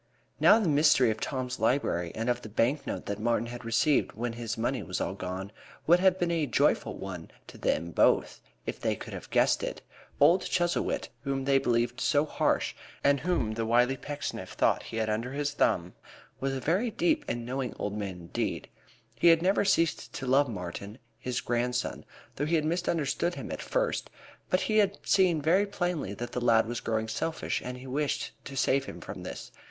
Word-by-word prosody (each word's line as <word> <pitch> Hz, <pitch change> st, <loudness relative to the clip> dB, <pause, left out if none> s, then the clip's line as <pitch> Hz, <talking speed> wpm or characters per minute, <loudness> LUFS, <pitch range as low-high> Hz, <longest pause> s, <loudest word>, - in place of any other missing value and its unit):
Now, 215 Hz, -, +7 dB
the 210 Hz, -, 0 dB
mystery 145 Hz, -5 st, +5 dB
of 110 Hz, -, -4 dB
Tom's 130 Hz, -2 st, -3 dB
library, 110 Hz, -, +1 dB
and 115 Hz, +2 st, -2 dB
of 120 Hz, 0 st, +1 dB
the 110 Hz, -, -9 dB
bank 120 Hz, +7 st, 0 dB
note -, -, -4 dB
that 100 Hz, 0 st, -3 dB
Martin 115 Hz, +1 st, +1 dB
had 120 Hz, +1 st, -7 dB
received 125 Hz, +6 st, +2 dB
when 120 Hz, +1 st, -3 dB
his 115 Hz, -2 st, -4 dB
money 120 Hz, +2 st, -1 dB
was 90 Hz, -2 st, -4 dB
all -, -, -1 dB
gone, 95 Hz, 0 st, -5 dB, 0.3 s
would 175 Hz, +2 st, +6 dB
have 185 Hz, 0 st, +4 dB
been 175 Hz, -2 st, 0 dB
a 170 Hz, -, +1 dB
very 150 Hz, -, 0 dB
joyful 120 Hz, -, +1 dB
one 90 Hz, -4 st, -7 dB, 0.2 s
to -, -, -13 dB
them 85 Hz, +1 st, 0 dB
both -, -, +2 dB, 0.2 s
if -, -, -4 dB
they -, -, 0 dB
could -, -, -9 dB
have -, -, -8 dB
guessed -, -, +3 dB
it. -, -, -5 dB, 0.4 s
Old 180 Hz, +2 st, +6 dB
Chuzzlewit, 175 Hz, -1 st, 0 dB
whom 135 Hz, -1 st, -2 dB
they 135 Hz, 0 st, +4 dB
believed 120 Hz, 0 st, 0 dB
so 145 Hz, +1 st, +3 dB
harsh, -, -, 0 dB, 0.3 s
and 140 Hz, 0 st, +4 dB
whom 170 Hz, -8 st, 0 dB
the 115 Hz, +1 st, -2 dB
wily 120 Hz, +3 st, +3 dB
Pecksniff 145 Hz, +2 st, -5 dB
thought -, -, +2 dB
he 115 Hz, -, -7 dB
had 110 Hz, -, +1 dB
got 110 Hz, -, 0 dB
under 115 Hz, +4 st, -3 dB
his 145 Hz, 0 st, -1 dB
thumb, 90 Hz, -10 st, +1 dB, 0.5 s
was 135 Hz, 0 st, -1 dB
a -, -, -2 dB
very 185 Hz, -, +1 dB
deep 310 Hz, +6 st, +1 dB
and 120 Hz, -1 st, -3 dB
knowing 130 Hz, 0 st, -3 dB
old 105 Hz, 0 st, -3 dB
man 95 Hz, -4 st, -4 dB
indeed. 85 Hz, -, -3 dB, 0.4 s
He 115 Hz, +9 st, +2 dB
had 165 Hz, 0 st, +6 dB
never 195 Hz, +3 st, +3 dB
ceased 170 Hz, -5 st, +1 dB
to 135 Hz, -, -5 dB
love 135 Hz, +2 st, +3 dB
Martin, 100 Hz, +1 st, -6 dB, 0.2 s
his 125 Hz, -1 st, -2 dB
grandson, 125 Hz, +1 st, -1 dB, 0.3 s
though 145 Hz, -, -1 dB
he 170 Hz, -, +2 dB
had 155 Hz, -2 st, +1 dB
misunderstood 170 Hz, 0 st, 0 dB
him -, -, -6 dB
at -, -, -4 dB
first, -, -, -1 dB, 0.4 s
but 185 Hz, -, +2 dB
he 215 Hz, -, +1 dB
had 200 Hz, -1 st, +2 dB
seen 175 Hz, -6 st, +3 dB
very 185 Hz, +6 st, +3 dB
plainly 175 Hz, -, -2 dB
that 120 Hz, +2 st, -5 dB
the 125 Hz, -, -3 dB
lad 115 Hz, -2 st, +4 dB
was 120 Hz, +1 st, -3 dB
growing 110 Hz, 0 st, -1 dB
selfish 160 Hz, +9 st, -2 dB
and 125 Hz, 0 st, -5 dB
he 125 Hz, -, -11 dB
wished 140 Hz, +3 st, -1 dB
to 135 Hz, -1 st, -7 dB
save 135 Hz, +1 st, +2 dB
him -, -, -8 dB
from -, -, -8 dB
this. -, -, -7 dB
130 Hz, 205 wpm, -29 LUFS, 115-160 Hz, 0.5 s, Now